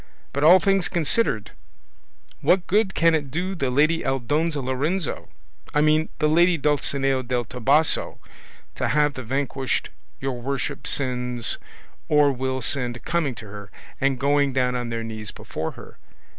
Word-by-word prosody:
But 140 - -1
all 175 +4 +8
things 195 -1 +1
considered, 175 +7 0 0.9
what 180 -1 +2
good 200 0 +1
can 165 0 +4
it 145 -3 -1
do 180 +7 -2
the 140 -8 -1
lady 155 +6 +2
Aldonza 145 +5 0
Lorenzo, 140 +7 -2 0.5
I 150 - +4
mean 155 +1 +3
the 150 - +2
lady 170 +3 +4
Dulcinea 135 -2 +1
del 120 -1 -2
Toboso, 135 +7 +1 0.6
to - - -2
have 150 -1 +2
the 130 - -6
vanquished 135 +1 -2 0.3
your 130 -3 -3
worship 135 +1 -3
sends 125 -4 0 0.5
or 150 -1 +5
will 130 0 -2
send 125 -2 -1
coming 160 -7 0
to 110 - -10
her 100 -1 -10 0.3
and 135 -2 +1
going 140 0 +2
down 125 -1 +1
on 120 -1 -3
their 115 -1 -3
knees 110 -2 -6
before 80 +1 -5
her? - - -13
140 Hz, 150 wpm, -24 LUFS, 125-155 Hz, 0.9 s, all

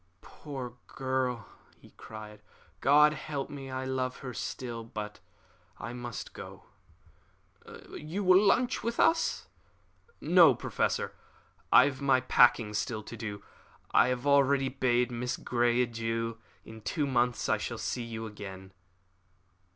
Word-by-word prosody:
"Poor 135 -5 -8
girl!" 130 -4 -2 0.3
he - - -19
cried. 105 -1 -11 0.4
"God 150 +4 +5
help 145 -3 -5
me, 135 -2 -7
I 130 0 -4
love 130 -1 -2
her 125 - -5
still! 120 -1 -5
But 105 -2 -7 0.6
I 120 - -6
must 120 -1 -7
go." - - -10 1.3
"You 165 +7 -5
will 185 +1 +6
lunch 245 +5 +2
with 235 0 -3
us?" 330 0 +2 0.7
"No, - - +6
Professor; - - -1 0.6
I - - +8
have 140 -1 -3
my 135 -2 +4
packing 120 -4 +4
still 110 +1 -2
to 115 - -9
do. 105 -2 -6 0.5
I - - +5
have 125 +1 -2
already 140 -1 +4
bade 125 -2 +1
Miss 120 0 -3
Grey 120 0 +1
adieu. 115 -1 -3 0.3
In 110 0 -11
two 145 +7 -1
months 125 -3 +1
I - - +2
shall - - -4
see 125 - -3
you 115 -1 -6
again." 95 -3 -9
125 Hz, 135 wpm, -30 LUFS, 115-135 Hz, 1.3 s, I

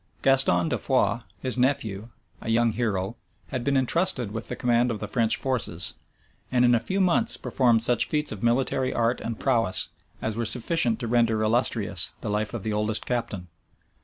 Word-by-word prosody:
Gaston 130 -11 +4
de - - -1
Foix, 105 +4 +1 0.2
his 130 -1 +1
nephew, 115 -5 -1 0.3
a - - -6
young 115 0 +2
hero, 105 -2 -2 0.3
had 130 -2 -3
been 140 0 +1
intrusted 130 - 0
with 115 +2 -6
the - - -5
command 120 0 +1
of 115 - -2
the 105 - -5
French 115 +1 +1
forces; 115 -10 -1 0.6
and 125 -1 +3
in 120 - +4
a 120 - +4
few 190 - -3
months 185 -3 +3
performed 120 -4 +2
such 120 -1 +3
feats 150 -1 -1
of 105 - -7
military 130 +2 +1
art 120 +1 0
and 115 -1 -5
prowess, 115 -8 +1 0.3
as 110 -1 -3
were 115 - -2
sufficient 120 +1 +1
to 120 - -3
render 115 -2 +2
illustrious 110 -5 0
the 110 - -4
life 105 +2 -2
of 110 - -5
the 110 - -2
oldest 105 +1 -1
captain. 105 -7 -3
115 Hz, 185 wpm, -25 LUFS, 110-125 Hz, 0.6 s, Gaston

